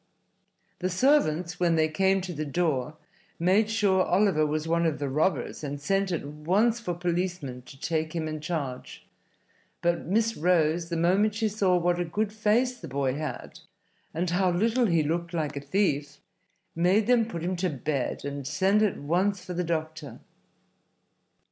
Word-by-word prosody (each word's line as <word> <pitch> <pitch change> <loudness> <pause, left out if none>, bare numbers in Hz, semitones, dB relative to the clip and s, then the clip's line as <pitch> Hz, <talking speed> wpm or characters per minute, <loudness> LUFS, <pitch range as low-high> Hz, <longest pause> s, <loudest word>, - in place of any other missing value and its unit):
The 185 - -1
servants, 180 - +2
when 170 -2 +3
they 160 -1 +3
came 190 +4 +2
to 180 -1 -5
the 155 -1 -3
door, 150 -2 -1 0.4
made 190 +6 +3
sure 200 -4 +2
Oliver 185 -6 +2
was 155 +1 -2
one 170 0 +2
of 155 - -1
the 145 - -3
robbers, 150 0 -1
and 145 0 -4
sent 195 +5 0
at 165 -4 -2
once 185 +11 +1
for 180 -7 -3
policemen 175 -7 -2
to 135 - -13
take 160 +1 -2
him 160 -1 -2
in 155 0 -4
charge; 145 -6 -5 0.7
but 170 -1 0
Miss 225 +4 +1
Rose, 165 0 +1
the 170 - -2
moment 195 +6 +2
she 220 0 +1
saw 195 -3 +2
what 175 0 +1
a - - +1
good 210 +5 -2
face 235 +4 +1
the - - -8
boy 135 -1 -1
had 155 +2 -6 0.5
and 170 +3 -2
how 185 +1 +2
little 225 +7 +2
he 170 -4 +2
looked 170 +3 -2
like 150 -3 -2
a 140 - -4
thief, 145 -3 0 0.6
made 185 +6 +3
them 235 -1 +3
put 170 -7 -6
him 180 +2 -1
to 185 +1 0
bed 140 -2 -3
and 140 -1 -5
send 195 +6 +2
at 210 -3 +1
once 180 +5 0
for 180 - -5
the 180 +1 -1
doctor. 155 -4 -4
175 Hz, 175 wpm, -27 LUFS, 155-195 Hz, 0.7 s, when